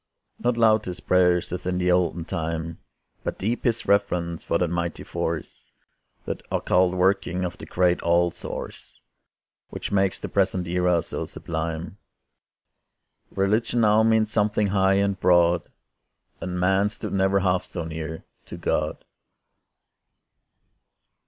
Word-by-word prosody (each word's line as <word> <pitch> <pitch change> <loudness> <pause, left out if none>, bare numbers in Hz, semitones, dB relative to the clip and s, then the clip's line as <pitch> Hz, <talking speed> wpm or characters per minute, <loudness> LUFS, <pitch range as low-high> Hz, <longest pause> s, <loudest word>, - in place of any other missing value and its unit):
Not 120 -1 0
loud 110 -2 +4
his 90 -1 -5
prayers, 90 -1 +2
as 90 0 -4
in 90 0 0
the 90 0 +2
olden 90 -2 +1
time, 80 -1 -4 0.4
But - - -3
deep 115 +5 -2
his 115 -2 +1
reverence 90 -4 +1
for 85 - +1
that 90 - +1
mighty 85 -1 -2
force, - - -5 0.5
That - - -4
occult 90 0 +2
working 90 -1 +1
of 85 - -6
the - - -9
great 90 -1 +2
All 85 +1 +3
Source, - - -8 0.7
Which - - -6
makes 95 -1 +1
the - - -5
present 95 -2 0
era 90 -1 +2
so - - -5
sublime. 80 +3 -5 1.3
Religion 110 +5 +1
now 110 0 +5
means 110 -1 +3
something 105 -1 +1
high 95 0 +3
and 100 -1 +1
broad. 85 -1 +3 0.7
And 90 -1 -3
man 95 +3 +3
stood 105 0 -6
never 95 0 +2
half 90 -1 +1
so 85 - -6
near 80 0 -6 0.2
to - - -8
God. - - -2
90 Hz, 135 wpm, -24 LUFS, 85-100 Hz, 1.3 s, now